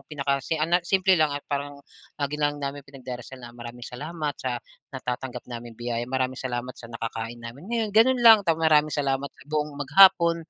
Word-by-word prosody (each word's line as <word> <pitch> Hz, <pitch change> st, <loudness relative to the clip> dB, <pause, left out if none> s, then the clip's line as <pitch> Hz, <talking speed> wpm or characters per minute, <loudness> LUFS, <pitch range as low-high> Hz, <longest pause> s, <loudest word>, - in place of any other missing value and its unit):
pinakasi 140 Hz, +1 st, -1 dB
ah, 160 Hz, -, +1 dB
na 175 Hz, +1 st, +3 dB
simple 190 Hz, 0 st, +3 dB
lang, 155 Hz, -2 st, +2 dB
eh, -, -, -5 dB
parang 145 Hz, 0 st, -3 dB, 0.4 s
lagi 145 Hz, +1 st, -1 dB
lang 145 Hz, 0 st, +1 dB
namin 140 Hz, +1 st, -4 dB
pinagdarasal 130 Hz, -1 st, -9 dB
na 120 Hz, -, -9 dB
maraming 120 Hz, 0 st, -9 dB
salamat 150 Hz, +3 st, -4 dB
sa 125 Hz, -2 st, -2 dB, 0.4 s
natatanggap 125 Hz, 0 st, -5 dB
naming 120 Hz, -2 st, -8 dB
biyaya, 120 Hz, 0 st, -2 dB
maraming 130 Hz, 0 st, -1 dB
salamat 125 Hz, 0 st, -4 dB
sa 115 Hz, -, -11 dB
nakakain 115 Hz, 0 st, -5 dB
namin 120 Hz, +5 st, -10 dB
ngayon, 225 Hz, -2 st, 0 dB
gano'n 245 Hz, +3 st, +5 dB
lang 225 Hz, -2 st, +9 dB
tap 160 Hz, -, +4 dB
maraming 155 Hz, -1 st, +4 dB
salamat 140 Hz, -1 st, -1 dB
sa -, -, -19 dB
buong 150 Hz, 0 st, -1 dB
maghapon, 170 Hz, +3 st, +6 dB
140 Hz, 185 wpm, -25 LUFS, 125-155 Hz, 0.4 s, lang